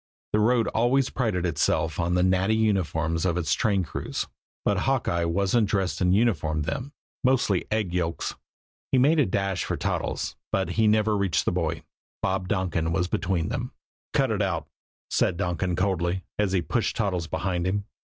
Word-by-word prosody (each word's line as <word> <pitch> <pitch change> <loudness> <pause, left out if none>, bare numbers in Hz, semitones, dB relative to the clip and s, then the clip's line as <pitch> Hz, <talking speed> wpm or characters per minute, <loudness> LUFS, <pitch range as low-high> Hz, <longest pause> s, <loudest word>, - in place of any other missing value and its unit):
The 105 - +4
road 115 +1 +3
always 125 +4 +2
prided 105 -8 0
itself 80 -1 0
on 85 +1 +1
the 90 - +3
natty 95 +3 +3
uniforms 80 -7 +1
of 90 -2 +1
its 80 -3 +1
train 100 -4 +1
crews, - - -4 0.4
but 100 -2 +2
Hawkeye 95 -8 +1
wasn't 100 +5 +2
dressed 95 -2 0
in 90 0 +3
uniform 90 -8 +2
then 125 - -4 0.3
mostly 125 -8 +2
egg 105 -5 -1
yolks. 85 -2 -1 0.6
He 130 - +4
made 150 +5 +4
a 140 - +4
dash 95 -1 -1
for - - -2
Toddles, - - -2 0.2
but 95 - 0
he 110 -1 +2
never 105 0 +3
reached 100 -6 +1
the - - +2
boy. - - -1 0.4
Bob 95 -1 0
Donkin 90 -4 0
was 90 +1 +1
between 90 -1 -1
them. 125 +1 -3 0.4
"Cut - - +2
it - - 0
out!" - - -1 0.4
said - - +2
Donkin 90 0 -1
coldly, 90 -1 0 0.2
as 105 -2 +2
he 90 -3 +2
pushed 120 +3 -1
Toddles 90 -6 -1
behind 90 0 -1
him. 100 +1 -1
95 Hz, 175 wpm, -26 LUFS, 85-110 Hz, 0.6 s, The